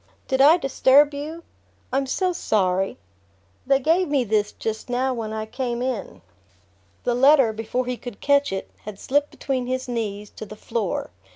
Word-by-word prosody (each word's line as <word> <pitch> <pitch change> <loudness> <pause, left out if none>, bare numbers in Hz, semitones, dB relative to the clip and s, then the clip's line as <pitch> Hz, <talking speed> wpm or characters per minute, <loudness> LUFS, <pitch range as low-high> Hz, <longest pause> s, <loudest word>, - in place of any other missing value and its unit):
"Did 265 0 +1
I 305 +5 +7
disturb 285 -1 +4
you? 310 +4 -6 0.5
I'm 270 0 +1
so 365 +6 0
sorry! 195 - 0 0.7
They 275 0 +5
gave 330 +7 +2
me 285 -3 +1
this 210 -2 0
just 220 +2 -5
now 255 +2 0
when 225 -3 -4
I 220 0 -3
came 240 +1 -3
in." 205 - -4 0.8
The 245 - +1
letter, 265 -2 +5
before 225 +3 -2
he 250 0 -3
could 245 -5 -9
catch 285 0 +2
it, 195 0 -5
had 210 -2 -7
slipped 290 +2 +1
between 260 -3 -3
his 255 0 -2
knees 210 -4 -4
to 215 - -8
the 215 - -9
floor. 215 - -3
250 Hz, 170 wpm, -23 LUFS, 220-280 Hz, 0.8 s, I